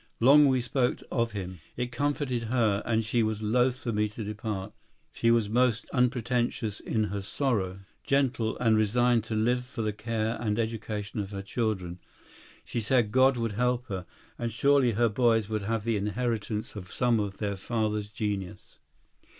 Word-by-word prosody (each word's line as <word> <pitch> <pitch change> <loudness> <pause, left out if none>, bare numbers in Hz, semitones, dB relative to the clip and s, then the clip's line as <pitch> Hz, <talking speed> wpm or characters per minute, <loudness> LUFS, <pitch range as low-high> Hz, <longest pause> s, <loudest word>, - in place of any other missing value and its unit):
Long 140 +5 +7
we 130 -2 +2
spoke 125 0 0
of 115 -2 0
him; 95 -3 -5 0.2
it 125 0 -2
comforted 140 -5 -1
her, 110 -4 +1
and 115 -1 +1
she 115 +1 +1
was 110 -1 -1
loath 125 +4 +2
for 120 -2 -3
me 105 0 +1
to 110 +2 -7
depart. 105 -1 -4 0.4
She 115 - +1
was 115 -2 +3
most 120 +1 +2
unpretentious 120 -4 0
in 110 -2 -1
her 100 - -2
sorrow, 95 -4 -1 0.2
gentle, 130 -5 +1
and 115 -3 +3
resigned 115 +2 +3
to 110 - -3
live 120 +3 +1
for 125 -2 -5
the 105 -1 -1
care 110 +1 -2
and 105 -2 0
education 110 -2 -3
of 100 -2 -3
her 100 -1 -6
children. 95 -5 -2 0.7
She 120 - -3
said 115 -1 +2
God 130 +1 +4
would 115 -2 -1
help 125 +3 0
her, 95 -3 -4 0.3
and 120 -1 -2
surely 135 0 +3
her 120 +3 +3
boys 115 -1 +2
would 110 -1 -1
have 110 +2 -2
the 115 -1 0
inheritance 110 +1 -2
of 95 -3 -8
some 120 -3 +2
of 100 -2 -3
their 100 -2 -2
father's 105 0 -1
genius. 100 -3 -5
115 Hz, 175 wpm, -28 LUFS, 105-125 Hz, 0.7 s, Long